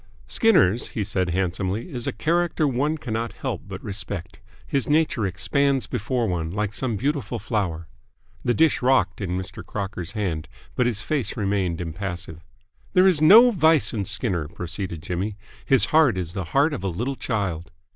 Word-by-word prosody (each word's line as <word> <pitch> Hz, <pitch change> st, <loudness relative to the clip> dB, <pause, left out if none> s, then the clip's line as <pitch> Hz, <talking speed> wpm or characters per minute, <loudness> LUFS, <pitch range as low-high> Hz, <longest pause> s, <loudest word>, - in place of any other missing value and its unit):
"Skinner's," 120 Hz, -, +3 dB
he 105 Hz, -, -3 dB
said 95 Hz, -3 st, -1 dB
handsomely, 95 Hz, -, -2 dB
"is 120 Hz, -2 st, -3 dB
a -, -, +1 dB
character 165 Hz, -, +1 dB
one 145 Hz, +4 st, 0 dB
cannot 115 Hz, -4 st, -3 dB
help -, -, -4 dB
but -, -, -8 dB
respect. 100 Hz, -3 st, -5 dB, 0.3 s
His 135 Hz, -3 st, -1 dB
nature 150 Hz, -9 st, +2 dB
expands 135 Hz, +9 st, +1 dB
before 120 Hz, 0 st, -1 dB
one 85 Hz, -4 st, -2 dB
like 105 Hz, +3 st, -2 dB
some 120 Hz, -1 st, -1 dB
beautiful 130 Hz, -2 st, -1 dB
flower." 95 Hz, -7 st, -2 dB, 0.6 s
The 120 Hz, -, +1 dB
dish 160 Hz, -1 st, +3 dB
rocked 125 Hz, -7 st, +2 dB
in 90 Hz, -2 st, -2 dB
Mr. 95 Hz, -1 st, -6 dB
Crocker's 95 Hz, -4 st, -5 dB
hand, 85 Hz, -8 st, -2 dB, 0.3 s
but 125 Hz, -, +2 dB
his 110 Hz, -3 st, -2 dB
face 145 Hz, -7 st, -2 dB
remained 95 Hz, -5 st, 0 dB
impassive. 85 Hz, -1 st, -5 dB, 0.5 s
"There 185 Hz, 0 st, +5 dB
is 180 Hz, -6 st, +4 dB
no 225 Hz, +10 st, +8 dB
vice 160 Hz, -, +3 dB
in 105 Hz, -4 st, -2 dB
Skinner," 95 Hz, -, -2 dB
proceeded 90 Hz, -1 st, -5 dB
Jimmy. 95 Hz, +5 st, -3 dB, 0.3 s
"His 135 Hz, -, +5 dB
heart 150 Hz, -10 st, +5 dB
is 85 Hz, -2 st, -4 dB
the 95 Hz, -3 st, -3 dB
heart 140 Hz, -, +2 dB
of 130 Hz, -, -5 dB
a -, -, 0 dB
little 120 Hz, +10 st, -2 dB
child." 100 Hz, -10 st, -3 dB
105 Hz, 165 wpm, -24 LUFS, 90-135 Hz, 0.6 s, no